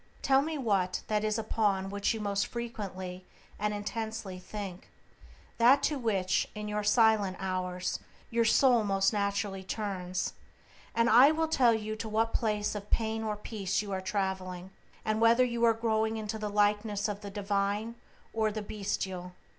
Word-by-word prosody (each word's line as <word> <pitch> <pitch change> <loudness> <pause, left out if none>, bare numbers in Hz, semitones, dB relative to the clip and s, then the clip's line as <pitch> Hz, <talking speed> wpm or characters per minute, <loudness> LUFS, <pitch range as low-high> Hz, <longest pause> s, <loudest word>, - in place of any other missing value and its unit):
Tell 270 0 +5
me 315 +2 -3
what 195 -8 0
that 210 -1 +1
is 215 0 0
upon 205 -3 0
which 200 0 0
you 225 - -2
most 200 -1 0
frequently 195 -6 -6 0.4
and 210 +1 0
intensely 215 -2 -4
think, 195 -1 -7 0.7
that 260 +5 +6
to 295 -3 +1
which, 195 -6 +1
in 210 0 -5
your 210 0 -2
silent 210 -3 +3
hours, 185 -1 -2 0.3
your 230 0 +3
soul 240 +1 +4
most 195 0 +2
naturally 200 -1 -1
turns, 185 -3 -3 0.6
and 230 0 +3
I 245 +5 +8
will 320 +1 +1
tell 245 -7 +4
you 215 0 -3
to 220 0 -5
what 225 +1 +1
place 210 -2 0
of 210 -1 -7
pain 225 0 0
or 215 -1 -1
peace 205 -2 -2
you 205 - -7
are 190 -1 -2
traveling, 190 -2 -3 0.3
and 215 0 0
whether 235 +2 +6
you 235 -1 -2
are 230 - +5
growing 220 -1 0
into 220 0 -4
the 210 -1 -3
likeness 205 0 +1
of 205 -1 -4
the 205 - -6
divine 200 +2 -1 0.4
or 220 -1 +1
the 215 0 -4
bestial. 190 -3 -4
210 Hz, 165 wpm, -30 LUFS, 195-225 Hz, 0.7 s, I